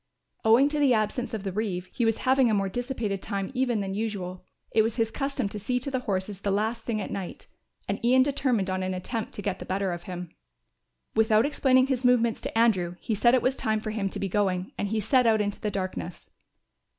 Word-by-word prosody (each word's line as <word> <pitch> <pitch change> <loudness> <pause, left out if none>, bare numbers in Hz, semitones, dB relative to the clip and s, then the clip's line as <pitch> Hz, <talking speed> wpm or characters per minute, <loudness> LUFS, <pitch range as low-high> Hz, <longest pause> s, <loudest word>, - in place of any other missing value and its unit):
Owing 230 +5 +6
to 300 0 -1
the 275 -4 +4
absence 230 +4 -1
of 220 -4 -4
the 195 - -2
reeve 190 -3 -2
he 240 - 0
was 225 -1 +2
having 260 -1 +4
a 215 - +2
more 195 -1 0
dissipated 230 -3 -3
time 195 0 -3
even 250 -4 +1
than 195 -1 -3
usual. 195 -4 -4 0.3
It 220 - +4
was 225 0 0
his 225 -2 0
custom 275 -5 -2
to 210 - -5
see 250 +5 -1
to 275 +3 -4
the 260 - 0
horses 195 -3 -3
the 200 - -1
last 220 +3 0
thing 225 -2 -2
at 205 - -5
night, 190 -3 -6 0.4
and 200 +3 -3
Ian 255 +2 +5
determined 260 -7 0
on 185 0 -1
an 185 0 -2
attempt 220 +5 -4
to 205 - -6
get 195 -2 -2
the - - -6
better 190 0 -1
of 175 0 -4
him. 180 -1 -6 0.8
Without 220 0 +4
explaining 260 -3 +3
his 265 -2 -1
movements 235 -2 +3
to - - -4
Andrew 190 -7 +3
he 225 - -2
said 240 +4 +4
it 255 - +1
was 260 +1 +2
time 220 -3 0
for 215 0 -4
him 205 -3 -1
to - - -5
be 195 - -1
going, 190 -1 0
and 205 - -2
he 220 +2 -1
set 245 +4 +3
out 220 -1 +4
into 205 -1 -2
the 210 - -1
darkness. 185 -3 -5
220 Hz, 235 wpm, -27 LUFS, 195-245 Hz, 0.8 s, Owing